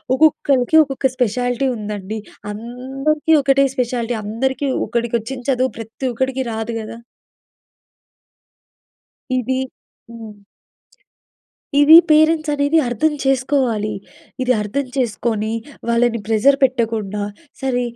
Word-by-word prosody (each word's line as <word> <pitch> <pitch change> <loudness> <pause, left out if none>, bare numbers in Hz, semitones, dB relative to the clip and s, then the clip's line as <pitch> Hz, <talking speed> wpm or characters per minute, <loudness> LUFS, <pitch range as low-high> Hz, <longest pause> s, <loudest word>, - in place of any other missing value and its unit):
ఒక్కొక్కలకి 285 -2 +3
ఒక్కొక్క 270 -2 -1
స్పెషాలిటీ 245 +2 0
ఉందండి. 210 0 -5 0.3
అందరికీ 265 +8 -2
ఒకటే 275 0 +3
స్పెషాలిటీ, 240 -1 -1
అందరికీ 265 +6 -2 0.2
ఒకడికి 235 0 -1
వచ్చిన 250 +4 -7
చదువు 255 0 0
ప్రతి 225 +4 -5
ఒక్కడికి 260 +2 -1
రాదు 225 +1 -4
కదా! 220 +1 -8 2.4
ఇది 260 +1 -1 0.5
హ్మ్. 220 -3 -10 1.4
ఇది 295 +2 +8
పేరెంట్స్ 310 0 +4
అనేది 285 +2 +2
అర్థం 270 +6 0
చేసుకోవాలి. 260 -5 +1 0.5
ఇది 255 0 +1
అర్థం 265 +7 -2
చేసుకొని, 220 -3 -1 0.4
వాళ్ళని 235 0 +2
ప్రెజర్ 230 +6 +3
పెట్టకుండా, 225 -5 0 0.4
"సరే 255 -2 0
250 Hz, 95 wpm, -19 LUFS, 225-270 Hz, 2.4 s, ఇది